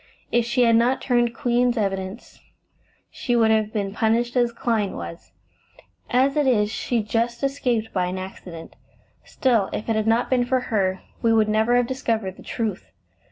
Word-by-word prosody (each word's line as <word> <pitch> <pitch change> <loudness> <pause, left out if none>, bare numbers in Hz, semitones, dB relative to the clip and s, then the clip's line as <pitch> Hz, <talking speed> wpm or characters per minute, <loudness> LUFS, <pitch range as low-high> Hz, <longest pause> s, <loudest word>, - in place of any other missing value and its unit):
If 240 -1 +2
she 240 +1 +2
had 230 -1 +5
not 245 +3 +2
turned 240 -2 +1
Queen's 245 0 +1
evidence, 195 +1 -4 0.7
she 245 - -2
would 225 -2 +4
have 215 -1 +1
been 200 -3 -3
punished 230 +3 0
as 240 -1 +2
Clyne 225 -4 -1
was; 85 -1 -8 0.8
as 265 +3 +2
it 295 -2 +2
is, 210 -4 +2
she 230 0 -1
just 235 +4 -1
escaped 250 -5 -1
by 180 -2 0
an 185 +1 -4
accident. 185 -3 -9 0.5
Still, 230 -7 +1
if 210 - -4
it 225 - +2
had 215 0 0
not 230 +2 +2
been 250 -2 +2
for 255 +1 +1
her, 190 -2 +1 0.2
we 230 - +2
should 220 -1 +3
never 220 +3 +2
have 245 0 +3
discovered 225 -7 -2
the - - -13
truth. 220 -6 -4
230 Hz, 175 wpm, -23 LUFS, 210-245 Hz, 0.8 s, had